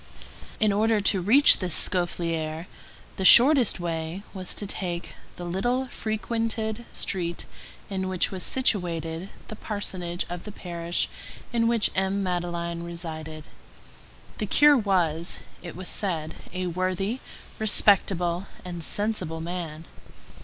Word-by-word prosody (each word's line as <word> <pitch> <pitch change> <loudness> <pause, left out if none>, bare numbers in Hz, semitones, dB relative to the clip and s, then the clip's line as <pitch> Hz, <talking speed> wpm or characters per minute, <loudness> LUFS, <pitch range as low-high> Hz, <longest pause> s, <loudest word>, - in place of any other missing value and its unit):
In 215 -2 +3
order 220 +1 +2
to 195 -2 +3
reach 255 +11 +7
this 180 -4 +1
Scaufflaire, 165 -2 0 0.5
the 190 - -2
shortest 250 +1 +7
way 165 +2 -4
was 185 -2 -3
to 205 - -4
take 175 -3 -4 0.2
the 175 - -7
little 245 +9 -1
frequented 220 0 -3
street 175 -3 -3 0.4
in 190 -1 -3
which 185 -2 0
was 190 -2 -5
situated 175 -8 -1 0.2
the 215 - -7
parsonage 185 -5 -3
of 175 0 -6
the 210 - -8
parish 170 -3 -2 0.5
in 230 -1 +2
which 230 -3 +2
M. 190 +1 0
Madeleine 170 -2 -2
resided. 160 -2 -7 1.0
The 210 - -2
curé 290 +2 +5
was, 170 -4 0 0.2
it 175 -2 -8
was 185 +1 -6
said, 165 -6 -2 0.2
a 185 0 -3
worthy, 185 +6 -1 0.4
respectable, 195 -4 +2 0.2
and 175 -2 -6
sensible 190 -5 -1
man. 165 -2 -5
185 Hz, 125 wpm, -26 LUFS, 170-210 Hz, 1.0 s, reach